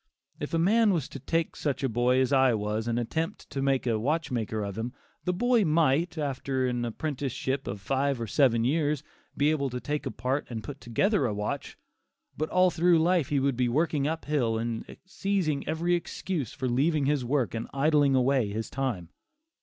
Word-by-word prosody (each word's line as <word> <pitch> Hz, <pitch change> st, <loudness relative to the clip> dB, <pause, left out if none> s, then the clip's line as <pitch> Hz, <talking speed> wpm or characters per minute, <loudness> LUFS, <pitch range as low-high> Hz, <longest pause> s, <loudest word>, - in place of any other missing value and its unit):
If 150 Hz, +3 st, -3 dB
a -, -, +3 dB
man 210 Hz, +5 st, +4 dB
was 155 Hz, -6 st, -1 dB
to 140 Hz, -, -8 dB
take 165 Hz, +5 st, -1 dB
such 140 Hz, -2 st, -2 dB
a -, -, +3 dB
boy 120 Hz, +2 st, +2 dB
as 130 Hz, +2 st, +1 dB
I 130 Hz, -3 st, +5 dB
was 105 Hz, +1 st, -2 dB
and 120 Hz, 0 st, 0 dB
attempt 160 Hz, +8 st, -3 dB
to 135 Hz, -, -2 dB
make 135 Hz, -1 st, +1 dB
a 115 Hz, -3 st, +1 dB
watchmaker 120 Hz, -6 st, -1 dB
of 100 Hz, -1 st, -4 dB
him, 115 Hz, +3 st, -4 dB, 0.3 s
the 180 Hz, -, +2 dB
boy 235 Hz, +4 st, +3 dB
might, 160 Hz, 0 st, +2 dB
after 135 Hz, -3 st, -1 dB
an 120 Hz, -1 st, -1 dB
apprenticeship 135 Hz, +1 st, -3 dB
of 100 Hz, 0 st, -4 dB
five 135 Hz, +5 st, 0 dB
or 115 Hz, -, -2 dB
seven 115 Hz, +1 st, +3 dB
years, 150 Hz, +2 st, +1 dB, 0.3 s
be 145 Hz, +2 st, +3 dB
able 140 Hz, -3 st, 0 dB
to 125 Hz, 0 st, -4 dB
take 150 Hz, +3 st, -3 dB
apart 130 Hz, +6 st, -2 dB
and 115 Hz, -3 st, -5 dB
put 145 Hz, -1 st, -8 dB
together 145 Hz, -, +1 dB
a 105 Hz, -, -2 dB
watch; 105 Hz, 0 st, -4 dB, 0.6 s
but 155 Hz, +1 st, -2 dB
all 185 Hz, 0 st, +4 dB
through 170 Hz, +1 st, +4 dB
life 165 Hz, -2 st, +2 dB
he 145 Hz, -, +2 dB
would 135 Hz, -1 st, +1 dB
be 125 Hz, 0 st, +1 dB
working 145 Hz, +1 st, +1 dB
up 160 Hz, +1 st, -3 dB
hill 125 Hz, -7 st, +1 dB
and 115 Hz, 0 st, -4 dB
seizing 185 Hz, -7 st, -1 dB
every 165 Hz, +3 st, 0 dB
excuse 170 Hz, -, -2 dB
for 130 Hz, -, -3 dB
leaving 140 Hz, +4 st, +2 dB
his 145 Hz, -2 st, +1 dB
work 130 Hz, -2 st, 0 dB
and 115 Hz, 0 st, -3 dB
idling 145 Hz, -1 st, +3 dB
away 130 Hz, -3 st, +2 dB
his 110 Hz, +2 st, -4 dB
time. 120 Hz, -11 st, -2 dB
135 Hz, 195 wpm, -28 LUFS, 120-155 Hz, 0.6 s, I